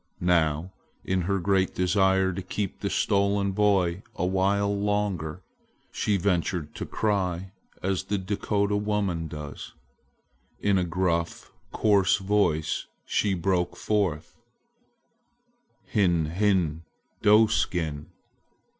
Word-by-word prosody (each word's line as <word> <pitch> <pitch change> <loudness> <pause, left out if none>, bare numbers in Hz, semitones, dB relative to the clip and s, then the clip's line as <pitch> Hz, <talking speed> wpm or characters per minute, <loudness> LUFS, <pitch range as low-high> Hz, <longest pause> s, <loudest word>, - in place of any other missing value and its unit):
Now, 80 +1 +1 0.3
in 95 0 0
her 100 - +2
great 95 0 +1
desire 95 0 +2
to 95 - -4
keep 95 +1 -4
the - - -2
stolen 100 0 +1
boy 95 -3 +2
awhile 100 +3 +1
longer, 100 -5 -2 0.5
she 105 -2 0
ventured 90 -4 -1
to - - -5
cry 95 -3 -1 0.3
as 95 0 -1
the 100 +1 -1
Dakota 100 +1 -1
woman 105 -5 -1
does. 75 -1 -8 0.9
In 100 -2 +2
a - - +1
gruff, 85 -1 -1 0.2
coarse 100 -3 +3
voice 95 -6 0 0.2
she 100 -2 +1
broke 90 0 0
forth: 90 -7 -1 1.5
"Hin 85 -6 +1
hin, 90 -5 +1 0.4
doe 105 +2 +6
skin! 80 -8 -1
95 Hz, 105 wpm, -26 LUFS, 85-100 Hz, 1.5 s, doe